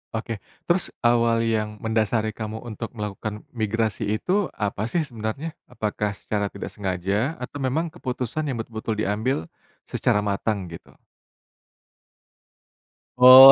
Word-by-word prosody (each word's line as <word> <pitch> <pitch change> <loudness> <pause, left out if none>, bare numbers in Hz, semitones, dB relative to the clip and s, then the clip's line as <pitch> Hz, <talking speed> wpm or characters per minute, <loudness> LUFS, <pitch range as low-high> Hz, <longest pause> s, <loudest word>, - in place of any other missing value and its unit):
Oke. 110 -1 -3 0.2
Terus, 175 +1 +2 0.2
awal 115 -1 +4
yang 110 -2 0
mendasari 110 0 +1
kamu 110 0 -5
untuk 115 0 -6
melakukan 105 0 -4
migrasi 110 -2 0
itu, 190 - +1
apa 105 +1 -1
sih, 160 +7 +1
sebenarnya? 120 +5 -4 0.2
Apakah 105 -1 -2
secara 105 0 -1
tidak 100 - -6
sengaja, 100 - 0
atau 125 +3 -6
memang 155 +6 0
keputusan 130 -1 -3
yang 135 - -1
betul-betul 110 -1 -3
diambil, 110 +6 +1 0.5
secara 105 0 +1
matang, 100 -3 -1
gitu? 85 - -11 2.2
Oh. 130 +2 +13
110 Hz, 120 wpm, -25 LUFS, 105-125 Hz, 2.2 s, Oh